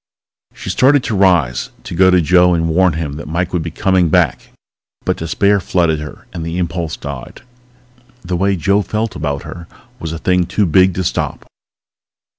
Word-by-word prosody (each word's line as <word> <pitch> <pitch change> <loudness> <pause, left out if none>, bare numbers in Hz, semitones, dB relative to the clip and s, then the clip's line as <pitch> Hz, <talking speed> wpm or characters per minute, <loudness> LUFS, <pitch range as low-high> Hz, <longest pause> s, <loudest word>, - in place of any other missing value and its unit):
She - - -5
started 135 +1 +4
to 110 - -2
rise, 90 -10 +2
to - - -7
go 95 +2 +4
to 90 -1 +4
Joe 90 +2 +4
and 80 0 0
warn 90 +1 +3
him 75 -2 -4
that 75 - -8
Mike 85 +3 -2
would 90 - 0
be 80 - -4
coming 90 +1 +1
back. 85 -4 +1 0.6
But - - +1
despair 100 +5 +1
flooded 85 -4 0
her 75 0 -9
and 85 -2 -5
the 85 +2 -4
impulse 85 -2 -3
died. 70 -3 -8 0.8
The 90 0 -3
way 100 +2 +1
Joe 100 +5 +1
felt 110 0 -3
about 70 -1 -3
her 85 -1 -9 0.3
was 80 - -5
a 80 - -4
thing 90 +1 +1
too 105 - +1
big 90 +2 +3
to 95 - -1
stop - - -3
90 Hz, 185 wpm, -16 LUFS, 80-95 Hz, 0.8 s, started